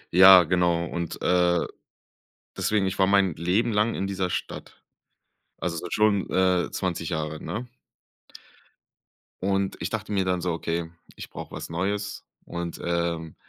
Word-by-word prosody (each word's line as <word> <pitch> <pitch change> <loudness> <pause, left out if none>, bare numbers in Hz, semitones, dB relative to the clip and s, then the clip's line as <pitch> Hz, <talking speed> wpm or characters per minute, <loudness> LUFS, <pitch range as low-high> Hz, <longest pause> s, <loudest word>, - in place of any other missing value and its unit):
Ja, 95 0 +10
genau 85 0 +1
und, 85 0 -4
äh, 90 -1 +3 0.9
deswegen, 105 -2 +1
ich 95 - -2
war 95 - +4
mein 100 -3 +3
Leben 90 +9 +1
lang 105 +2 +2
in 95 - -2
dieser 95 -2 -2
Stadt, - - -6 0.7
also 85 -2 -3
seit 85 +2 -5
schon, 105 -2 +2
äh, 95 -1 +2
20 85 -3 -2
Jahren, 80 -2 -4
ne? 120 +3 -5 1.7
Und 95 0 0
ich 85 - -2
dachte 110 -1 -4
mir 95 -1 +2
dann 90 -1 0
so: 90 -1 -1
„Okay, 85 0 -3 0.3
ich - - -8
brauche - - -9
was - - -6
Neues 100 +5 -3 0.2
und, 85 -1 -5
ähm, 85 -2 -2
90 Hz, 145 wpm, -25 LUFS, 85-100 Hz, 1.7 s, Ja